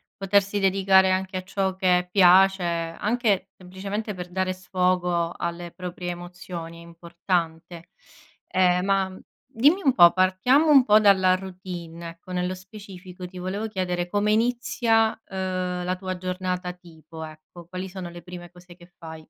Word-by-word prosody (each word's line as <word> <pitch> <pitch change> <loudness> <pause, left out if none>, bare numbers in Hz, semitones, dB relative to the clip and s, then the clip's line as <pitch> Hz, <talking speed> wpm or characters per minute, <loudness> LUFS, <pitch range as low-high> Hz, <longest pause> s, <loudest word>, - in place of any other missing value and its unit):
potersi 200 +1 +1
dedicare 190 0 +4
anche 185 0 -1
a 185 - -5
ciò 190 0 -2
che 180 -1 +2
piace, 190 0 +5
anche 190 +5 -1
semplicemente 195 +4 -5
per 180 -2 -8
dare 185 +1 -1
sfogo 180 -2 0
alle 170 0 -5
proprie 180 0 -6
emozioni 175 -1 -8
è - - -12
importante. 170 0 -4 0.6
Ehm, 180 0 +2
ma 195 -1 0 0.3
dimmi 280 - +2
un 270 -4 +3
po': 175 -8 +8
partiamo 190 - +3
un 280 -3 +7
po' 215 -1 +6
dalla 190 -3 +4
routine, 180 -3 -8
ecco, 170 +2 -13
nello 180 +1 -2
specifico 185 -2 -11
ti 180 0 -12
volevo 195 +5 -3
chiedere 180 -4 -2
come 205 +3 0
inizia, 225 -1 +1
ehm, 185 -1 -3
la 185 +1 -1
tua 185 0 -5
giornata 180 0 -3
tipo, 160 -2 -12
ecco. 155 +2 -12
Quali 185 +1 -6
sono 180 -2 -7
le 175 0 -11
prime 175 0 -10
cose 175 0 -16
che 175 -1 -17
fai? 160 -1 -10
185 Hz, 150 wpm, -24 LUFS, 175-195 Hz, 0.6 s, po